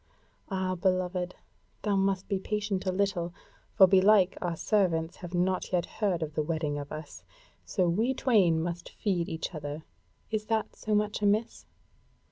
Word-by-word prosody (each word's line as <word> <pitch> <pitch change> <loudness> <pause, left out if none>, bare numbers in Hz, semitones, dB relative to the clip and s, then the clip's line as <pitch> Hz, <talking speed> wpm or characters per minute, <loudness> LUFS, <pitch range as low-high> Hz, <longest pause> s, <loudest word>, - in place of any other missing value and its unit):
Ah, 190 -2 -1
beloved, 185 0 0 0.5
thou 205 -2 +1
must 195 -1 +1
be 195 - 0
patient 205 -1 -2
a - - +3
little. 185 -3 -1 0.4
For 190 - +9
belike 190 0 +5
our 175 -2 -1
servants 170 -4 +1
have 175 0 -7
not 185 +1 0
yet 180 -2 +1
heard 190 -6 -1
of 155 -1 -5
the 155 - 0
wedding 150 -2 -2
of 145 0 -7
us. 155 -1 -8 0.4
So 185 -4 +1
we 225 +10 +1
twain 185 -12 +3
must 175 0 -4
feed 185 -6 -1
each 160 - -3
the 170 - -6
other. 150 +1 -6 0.5
Is 215 -1 -2
that 220 -1 -1
so 215 -1 -1
much 210 0 0
amiss?" 210 +2 0
185 Hz, 165 wpm, -29 LUFS, 170-205 Hz, 0.5 s, For